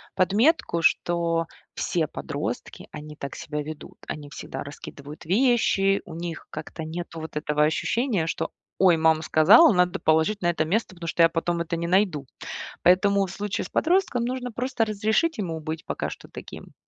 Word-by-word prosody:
подметку, 200 - +2
что 165 0 +1 0.3
все - - 0
подростки, - - -5
они 150 0 -9
так 140 -2 -7
себя 150 -2 -4
ведут. 155 +1 -9
Они 145 -1 -6
всегда - - -7
раскидывают 145 +1 -10
вещи, 200 -1 +3
у - - -10
них 170 -1 -6
как-то 155 +1 -7
нету 165 +1 -6
вот 160 -1 -8
этого 150 0 +1
ощущения, 195 - 0
что: - - -2 0.3
"Ой, 180 -3 +5
мама 160 0 +3
сказала, 160 - +7
надо 180 +1 +2
положить 160 +7 +2
на 175 - +2
это 165 -2 0
место, 190 +3 -1
потому 170 -1 -7
что 165 - 0
я 165 - +6
потом 170 +1 -1
это 170 0 -2
не 170 0 -2
найду". 180 -6 +2 0.6
Поэтому, 195 +2 +4
в 185 - -8
случае 205 +1 -3
с - - -9
подростком, 335 -8 +1
нужно 250 0 -3
просто 245 0 -1
разрешить 220 +10 +1
ему 165 -6 -3
быть 155 +1 -5
пока - - -3
что - - -10
таким. - - -10
175 Hz, 170 wpm, -25 LUFS, 160-205 Hz, 0.6 s, сказала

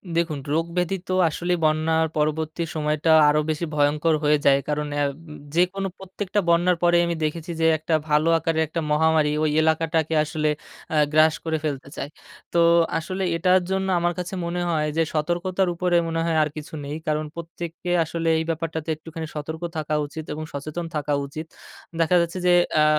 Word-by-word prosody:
দেখুন 165 -3 0
রোগ 165 +1 +1
ব্যাধি 180 +2 +1
তো 185 - -1 0.2
আসলেই 175 +3 -1
বন্যার 160 +1 +2
পরবর্তী 155 +2 -1
সময়টা 155 +1 +1 0.2
আরো 150 +1 +3
বেশি 155 +2 -1
ভয়ংকর 150 +2 +2
হয়ে 150 0 +4
যায়, 140 -1 +6
কারণ 150 0 -1
অ্যা 145 0 +1 0.5
যে 175 - +6
কোনো 195 0 -2
প্রত্যেকটা 190 +1 -3
বন্যার 175 +1 +3
পরে 175 0 +5
আমি 170 - -1
দেখেছি 160 +2 -3
যে, - - +3
একটা 160 +2 -3 0.2
ভালো 150 +2 +3
আকারে 165 0 -1
একটা 165 +2 -3
মহামারি 155 0 +3
ওই 155 - +2
এলাকাটাকে 160 0 +1
আসলে 155 0 -1 0.4
অ্যা 160 - +1 0.2
গ্রাস 155 0 +5
করে 160 -1 0
ফেলতে 140 -3 -3
চায়, 140 - -4 0.4
তো 170 - +3 0.4
আসলে 185 +4 -3
এটার 185 +2 +4
জন্য 190 0 0
আমার 175 0 +1
কাছে 180 +1 -5
মনে 175 +1 -2
হয় 155 -2 +1
যে, - - +4
সতর্কতার 175 +4 0
উপরে 180 0 +1
মনে 165 0 -2
হয় 165 -1 +1
আর 155 - -1
কিছু 155 +1 -8
নেই, 145 +1 -4
কারণ 155 0 0
প্রত্যেককে 170 +1 -6
আসলে 165 +1 -4
এই - - -1
ব্যাপারটাতে 160 -1 -3
একটুখানি 160 +1 -7
সতর্ক 160 +2 -5 0.2
থাকা 155 0 -2
উচিত 155 +2 -7
এবং 155 +1 -5
সচেতন 155 +4 -5
থাকা 145 -1 -1
উচিত 155 +3 -7 0.6
দেখা 165 +2 +3
যাচ্ছে 170 +2 -3
যে, 180 - +6 0.2
অ্যা 155 -1 +5
160 Hz, 180 wpm, -24 LUFS, 150-170 Hz, 0.6 s, যায়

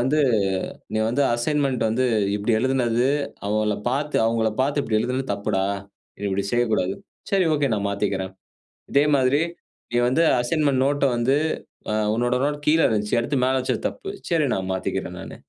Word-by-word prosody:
வந்து 140 +5 +2 0.7
நீ - - +1
வந்து 130 +5 +1
அசைன்மென்ட் 135 +1 0
வந்து 125 +4 +1 0.3
இப்டி 105 +3 0
எழுதினது, 125 -1 +1 0.4
அவங்கள 105 0 0
பார்த்து 145 +3 -1
அவங்கள 115 -1 +1
பார்த்து 140 +2 +1
இப்டி 110 -4 0
எழுதினது 125 +3 -2
தப்புடா. 100 -2 -1 0.6
நீ - - -1
இப்டி 95 +1 -1
செய்யக்கூடாது. 110 -6 +1 0.4
சரி 195 -2 +3
ஓகே 145 -4 +1
நான் 100 -1 -1
மாத்திக்கிறேன். 95 -1 -2 0.6
இதே 140 +1 +4
மாதிரி 135 +3 +3 0.5
நீ 120 - +2
வந்து 130 +7 +3 0.2
அசைன்மென்ட் 135 0 +1
நோட்ட 145 0 +1
வந்து 120 +4 +2 0.6
அ - - 0 0.2
உன்னோட 120 +2 +1
நோட் 145 +1 0
கீழ 160 +2 +4
இருந்துச்சு. 105 0 0
அடுத்து 135 +4 -1
மேல 130 +1 +2
வச்சது 130 - -1
தப்பு. 395 - -9 0.2
சரி 165 -3 +2
நான் 95 -1 -2
மாத்திக்கிறேன் 95 - -3
நானு. - - -8
125 Hz, 160 wpm, -23 LUFS, 110-140 Hz, 0.7 s, இதே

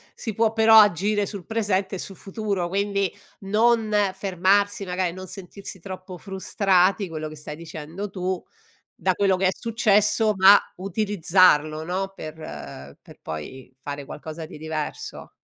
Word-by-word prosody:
si 225 - -5
può 225 +1 +2
però 220 0 +7
agire 205 +1 +3
sul 200 -3 -7
presente 200 -4 -1
e - - -4
sul 195 - -7
futuro, 195 -2 -3
quindi 200 0 0 0.3
non 220 +2 +2 0.2
fermarsi 195 +1 +1
magari 180 -1 -1
non 185 +1 -9
sentirsi 190 0 -9
troppo 185 -1 -8
frustrati, 190 -1 +1
quello 155 -1 -5
che 155 - -9
stai 150 0 -8
dicendo 170 +4 -7
tu 185 -1 -3 0.6
da - - +1
quello 195 -2 +2
che 190 +1 +1
è - - +4
successo, 215 -1 +2
ma 195 +2 +8 0.2
utilizzarlo, 180 -5 +2
no, 190 +3 -3
per 155 0 -7 0.7
per - - -17
poi 80 - -7
fare 145 0 -6
qualcosa 160 +3 -8
di 155 - -10
diverso. 155 -1 -5
190 Hz, 145 wpm, -24 LUFS, 170-205 Hz, 0.7 s, ma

